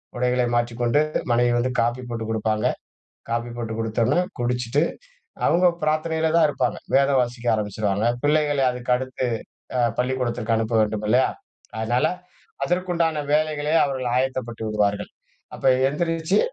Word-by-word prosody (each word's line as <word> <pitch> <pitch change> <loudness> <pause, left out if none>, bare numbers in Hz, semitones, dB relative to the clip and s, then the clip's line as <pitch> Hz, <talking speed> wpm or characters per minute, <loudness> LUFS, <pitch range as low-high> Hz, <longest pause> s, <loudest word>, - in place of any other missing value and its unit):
உடைகளை 125 0 +1
மாற்றிக்கொண்டு, 120 +2 +1 0.3
மனைவி 120 0 +3
வந்து 130 +2 0
காஃபி 120 +2 0
போட்டு 115 -1 -4
குடுப்பாங்க, 110 -1 0 0.6
காப்பி 120 +1 -1
போட்டு 115 -2 -4
குடுத்தோனே 115 +7 +1 0.2
குடிச்சிட்டு, 125 +3 0 0.6
அவங்க 175 +2 +3 0.2
பிரார்த்தனையில 160 +1 +1
தான் 165 -2 +6
இருப்பாங்க, - - -1 0.2
வேதம் 135 -1 +4
வாசிக்க 120 0 -4
ஆரம்பிச்சுடுவாங்க, 105 0 -1 0.2
பிள்ளைகளை 145 -2 +2
அதுக்கடுத்து 125 +1 -1 0.5
அ - - +3 0.2
பள்ளிக்கூடத்திற்கு 125 -3 0
அனுப்ப 115 +1 -1
வேண்டும் 105 0 0
இல்லையா, 125 +4 +4 0.5
அதனால 120 +3 +1 0.6
அதற்குண்டான 170 -3 0
வேலைகளே 150 0 +1
அவர்கள் 130 -3 -2
ஆயத்தப்பட்டு 130 -3 -2
விடுவார்கள். 105 -1 0 0.4
அப்ப - - -11 0.2
எந்திரிச்சு 165 +5 0
125 Hz, 120 wpm, -23 LUFS, 115-145 Hz, 0.6 s, தான்